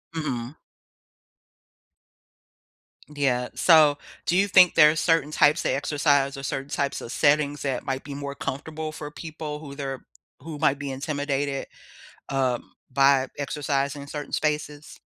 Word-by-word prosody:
Mhm. 135 -3 -4 2.5
D 145 -1 -4
yeah, 125 -2 +1
so, 155 -4 +6 0.3
do 175 - +1
you 200 +2 +3
think 185 -3 +6
there 150 - +8
are 160 - -4
certain 165 -3 +1
types 150 +2 +3
of - - +1
exercise 145 -1 +1
or 135 - -8
certain 135 +1 -4
types 140 -1 -2
of 115 - -7
settings 145 0 +2
that 135 -2 -2
might 135 -1 -3
be 145 - -7
more 140 0 -6
comfortable 155 +3 -5
for 150 -1 -7
people 155 -2 -7
who 140 -3 -9
they're 135 -2 -5 0.3
who 155 +2 -8
might 140 - +2
be 140 -1 -5
intimidated, 140 0 -2 0.6
um, 130 -3 -1 0.2
by 135 0 +4
exercising 140 0 -2
in 140 - -12
certain 145 0 -6
spaces? 150 -1 -3
145 Hz, 145 wpm, -25 LUFS, 135-150 Hz, 2.5 s, there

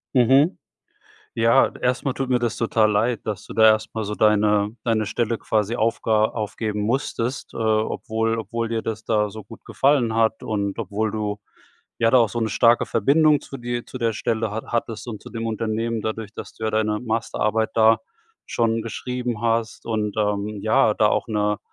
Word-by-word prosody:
Mhm. 135 +7 +4 0.8
Ja, 115 +1 +4
erst 125 +2 0
mal 135 - 0
tut 135 -1 -3
mir 125 -1 +3
das 120 -2 -1
total 110 -2 +2
leid, 110 +3 0
dass 105 -3 -4
du - - -9
da 110 0 +5
erst 110 0 +3
mal 110 -2 -3
so 105 +1 -4
deine 105 -1 +3 0.2
deine 110 -2 +1
Stelle 115 +1 -1
quasi 110 +1 -1
aufga 110 -1 +2
aufgeben 105 -1 -3
musstest, 125 +2 -2
äh, - - -8
obwohl 110 0 0
obwohl 115 0 -3
dir 115 -1 -1
das 110 0 -5
da 105 -2 +1
so 110 0 -9
gut 110 +3 -14
gefallen 130 -5 +2
hat 110 -1 +1
und 100 -1 -2
obwohl 105 +1 -2
du, 105 -1 -3 0.6
ja, 115 -1 +3
da 130 - +6
auch 115 -2 +4
so 115 +4 -4
'ne 110 - 0
starke 115 +2 +4
Verbindung 150 +6 +3
zu 135 - -10
dir 120 0 -4
zu 130 - -8
der 115 -2 0
Stelle 110 0 -2
ha 110 +1 -3
hattest 115 0 -3
und 110 -3 -6
zu - - -11
dem 115 -1 -4
Unternehmen 115 +1 -2
dadurch, 110 -1 -4
dass - - -9
du 110 - -6
ja - - +1
deine 105 -1 0
Masterarbeit 110 -1 -1
da 110 0 +5 0.5
schon 115 -1 0
geschrieben 125 0 -4
hast 115 -1 -1
und, 110 -2 -2
ähm, 105 0 -1
ja, 110 0 +3
da 105 - +4
auch - - 0
'ne 105 -1 0
110 Hz, 190 wpm, -23 LUFS, 105-115 Hz, 0.8 s, da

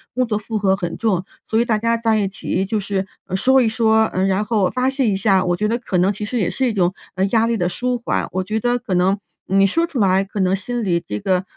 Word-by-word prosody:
工 255 0 +2
作 225 -3 -2
负 215 +1 -4
荷 195 -2 +2
很 175 -3 -4
重， 195 -6 0 0.2
所 220 - 0
以 - - +3
大 230 -3 +1
家 230 +2 +1
在 225 -1 +1
一 200 - +1
起 190 0 -2
就 215 +2 -1
是， 195 -1 -2 0.2
呃， 190 - -4
说 260 +6 +4
一 230 - +2
说， 220 -1 +3
嗯， 190 +1 +1
然 195 +2 +1
后 210 -4 +1
发 255 +1 0
泄 270 -1 0
一 205 - +2
下， 195 -2 +3
我 175 -1 +1
觉 210 +2 0
得 230 - 0
可 235 -6 -2
能 185 +3 +3
其 210 +1 -6
实 245 +4 -3
也 180 -5 +1
是 265 - -1
一 - - +1
种， 180 -2 +1 0.2
嗯， 190 +1 +1
压 225 -1 +3
力 230 0 0
的 175 -3 0
舒 250 +6 -1
缓。 235 - -2
我 185 - -1
觉 215 +3 -2
得 245 0 +1
可 225 -6 -4
能 190 +3 +2 0.3
你 195 +1 +4
说 330 - +1
出 295 -7 -5
来 195 -1 +3
可 200 +1 -7
能 190 0 +2
心 240 +5 -3
里 170 -3 0
这 105 - -4
个， 185 - 0
205 Hz, 300 characters per minute, -20 LUFS, 190-230 Hz, 0.3 s, 说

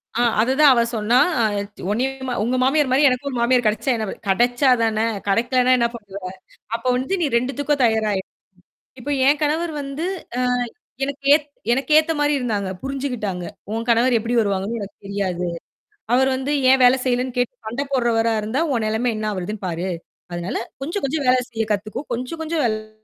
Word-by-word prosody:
அ, - - 0 0.2
அது 250 +3 +1
தான் 295 -3 +8
அவ 235 - +3
சொன்னா. 220 +3 +2 0.7
உன்னையும் 260 +3 -2
உங்க 250 +3 0
மாமியார் 275 0 +2
மாரி 280 +3 +4
எனக்கும் 255 +3 -2
ஒரு 250 - -4
மாமியார் 245 -1 +3
கிடைச்சா 220 +5 0
என்ன 220 -1 -2
ப - - -4
கிடைச்சா 245 +7 +3
தானே! 220 0 +1 0.2
கிடைக்கலனா 245 +5 +2
என்ன 235 -1 +2
பண்ணுவ? 200 -3 -9 0.5
அப்போ 235 +2 -5
வந்து 265 +9 -2
நீ - - +3
2துக்கும் 275 +3 -1
தயாரா 220 -2 +1
இரு. - - -8 0.8
இப்போ 290 +4 -5 0.2
என் 290 +1 +4
கணவர் 320 +2 0
வந்து, 280 +5 -4 0.3
அ - - +1 0.6
எனக்கு 280 0 -6
ஏ - - +6 0.3
எனக்கு 270 +3 -1
ஏத்த 315 +1 +1
மாதிரி 295 0 +2
இருந்தாங்க. 210 -6 -2
புரிஞ்சுக்கிட்டாங்க. 245 -10 -3 0.3
உன் 230 +1 -3
கணவர் 235 +2 +4
எப்படி 235 +2 -3
வருவாங்கன்னு 200 +2 -1
எனக்குத் 200 0 -10
தெரியாது. 190 -3 -2 0.7
அவர் 265 +1 +4
வந்து, 265 +2 -3 0.2
ஏன் 265 0 +5
வேலை 250 +1 +6
செய்யலைன்னு 250 0 0
கேட்டுச் 245 -2 -2
சண்டை 240 +6 -2
போடுறவரா 230 -3 +2
இருந்தா, 220 +7 -2
உன் 230 -2 0
நிலைமை 225 +3 0
என்ன 215 - -3
ஆகுறதுன்னு 195 +2 -5
பாரு. 175 +2 -3 0.4
அதனால 175 +1 -3 0.2
கொஞ்சம் 340 +8 -3
கொஞ்சம் 285 0 -2
வேலை 255 0 +5
செய்யக் 225 -2 -3
கத்துக்கோ. 210 +5 -2
கொஞ்சம் 255 +7 -4
கொஞ்சம் 320 -1 -1
வேலை 215 -1 -4
245 Hz, 175 wpm, -21 LUFS, 215-270 Hz, 0.8 s, தான்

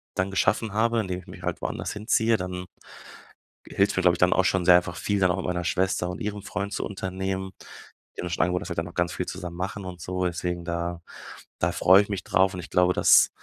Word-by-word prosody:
dann 95 +1 -1
geschaffen 105 +2 +1
habe, 115 +2 +2
indem 90 -3 -4
ich 90 - -16
mich 90 -1 -11
halt 90 -1 -3
woanders - - -3
hinziehe, 110 +1 +2
dann 90 0 -5 1.0
hilft's 100 +1 +1
mir, - - +3
glaube 90 -1 +5
ich, - - -9
dann 90 0 +4
auch 95 - +3
schon 95 -2 +1
sehr 90 0 +8
einfach 90 -1 -2
viel 105 -1 -1
dann 95 -1 +4
auch 90 - -1
mit 95 - -4
meiner 90 -1 -1
Schwester 90 0 0
und 90 - -6
ihrem 105 0 -3
Freund 100 0 -4
zu - - -2
unternehmen. 95 -1 -4 0.7
Die - - -4
haben - - -4
mir - - -6
schon 80 - 0
angeboten, 90 0 0
dass - - -8
wir 85 - -4
dann 85 +1 -1
auch - - -16
ganz 85 0 0
viel 90 - -3
zusammen 90 -2 -6
machen 95 +2 -4
und 90 -2 -8
so, 90 +2 -2
deswegen 90 0 -3
da 85 0 -3 0.6
da 85 - +1
freue 95 +2 +6
ich 100 - -13
mich 100 -3 -3
drauf 95 +1 +2
und - - -5
ich - - -11
glaube, 90 0 +3
dass - - +6
90 Hz, 250 wpm, -26 LUFS, 90-95 Hz, 1.0 s, sehr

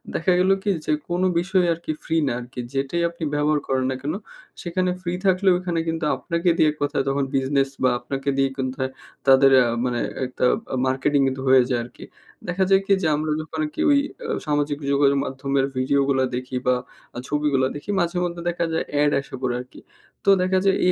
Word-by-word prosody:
দেখা 185 - +1
গেলো 190 +1 +4
কি? 210 - 0 0.2
যে, - - 0 0.2
কোনো 175 +2 +1
বিষয় 185 0 +1
আর 165 - -9
কি - - -1
ফ্রি 165 - -2
না - - +1
আরকি, 125 +1 -9
যেটাই 135 +5 -1
আপনি 170 -1 -9
ব্যবহার 150 +1 +2
করেন 130 -1 0
না - - -2
কেন, 145 +2 -2 0.5
সেখানে 180 +1 -1
ফ্রি 175 -1 -3
থাকলেও 190 0 +4
এখানে 175 -2 -2
কিন্তু 165 -1 -1
আপনাকে 170 +1 -1
দিয়ে 155 - +4
এক - - -11
কথায় 145 -1 0
তখন 135 +1 +1
বিজনেস 135 0 +1
বা 130 - +5
আপনাকে 135 +2 -4
দিয়ে 135 0 +2
কোনথায় 130 0 -2 0.4
তাদের 135 0 +6
আ - - +1 0.2
মানে 120 -1 -1 0.3
একটা 125 0 -5 0.3
আ - - +1
মার্কেটিং 135 +2 +1
কিন্তু 130 0 -3
হয়ে 130 -1 +7
যায় 125 - +1
আরকি। 120 - -12 0.4
দেখা 180 +2 0
যায় 195 0 +5
কি? 200 - +3
যে, 160 - +1
আমরা 155 +1 -2
যখন 160 0 -7
আর্কি 150 - -5
ওই 285 - +5 0.3
আ - - -4 0.2
সামাজিক 145 -1 0 0.2
যোগাযোগ 140 0 +3
মাধ্যমের 135 0 -1
ভিডিও 135 +2 +2
গুলা 130 -1 +2
দেখি 130 +1 -5
বা 125 - +4 0.4
আ - - -7
ছবিগুলা 145 -3 +1
দেখি, 145 +7 -9
মাঝে-মধ্যে 175 0 -1
দেখা 170 0 -1
যায় 160 - 0 0.2
এড 145 0 +3
আইসা 140 - -5
পড়ে 125 -2 -1
আরকি। 125 - -14 0.5
তো 200 - +4
দেখা 185 +1 +2
যায় 195 - +4
এই 180 - +5
145 Hz, 205 wpm, -23 LUFS, 135-175 Hz, 0.5 s, হয়ে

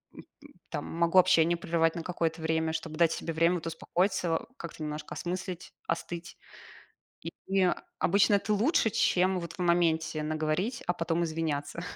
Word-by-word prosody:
м, - - -10 0.5
там - - -4
могу 170 +2 +3
общение 170 -1 +4
прервать 165 -1 +1
на 170 - -4
какое-то 165 -2 -2
время, 160 0 0
чтобы 160 -1 -4
дать 170 -1 +4
себе 165 - -3
время 165 +2 +3
вот 165 -2 -4
успокоиться, 175 +1 0
как-то 170 -1 -9
немножко 150 0 -5
осмыслить, 180 0 -5
остыть. 170 0 -4 0.8
И 165 - -6 0.2
и 190 -2 +3 0.3
обычно 200 +3 +4
это 210 +2 0
лучше, 225 - +3
чем 190 -3 +2
вот 170 -1 -7
в - - -16
моменте 170 -3 +2
наговорить, 155 +9 -1
а 175 - +2
потом 165 0 -1
извиняться 160 -1 -3
170 Hz, 155 wpm, -29 LUFS, 160-180 Hz, 0.8 s, общение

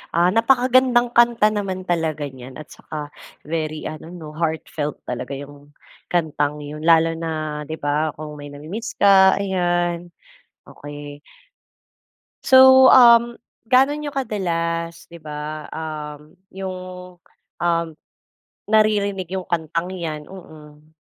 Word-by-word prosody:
Ah, 175 +1 +4
napaka-gandang 245 0 +3
kanta 235 -2 +5
naman 195 -3 -3
talaga 160 -4 -1
niyan 130 -1 -11
at 155 - -10
saka, 150 -2 -8 0.4
very 155 -1 -3
ano 155 +1 -8
'no 160 -4 -9
heartfelt 160 -2 -3
talaga 125 +2 -5
'yong 145 +1 -11 0.4
kantang 150 -3 -1
'yon 150 +1 -8
lalo 165 0 +4
na 155 -2 -4
'di 160 - -4
ba, 150 +2 0
kung 150 -1 -7
may 145 - -8
na-mi-miss 160 +11 -7
ka, 195 -1 +6
ayan, 175 -2 -1 0.6
okay. 145 0 -10 1.2
So, 260 0 +8
um, 235 -1 +6 0.3
gaano 270 +3 +4
niyo 295 -1 -5
kadalas, 170 -8 -3
di 170 - -12
ba, 150 0 -7
um, 150 0 -7 0.2
'yong 190 -1 -5 0.9
um, 170 -1 +1 0.8
naririnig 205 -3 +2
'yong 190 -1 -3
kantang 165 +1 -2
'yan? 155 -4 -5
Mm. 155 -5 -14
165 Hz, 115 wpm, -21 LUFS, 150-200 Hz, 1.2 s, So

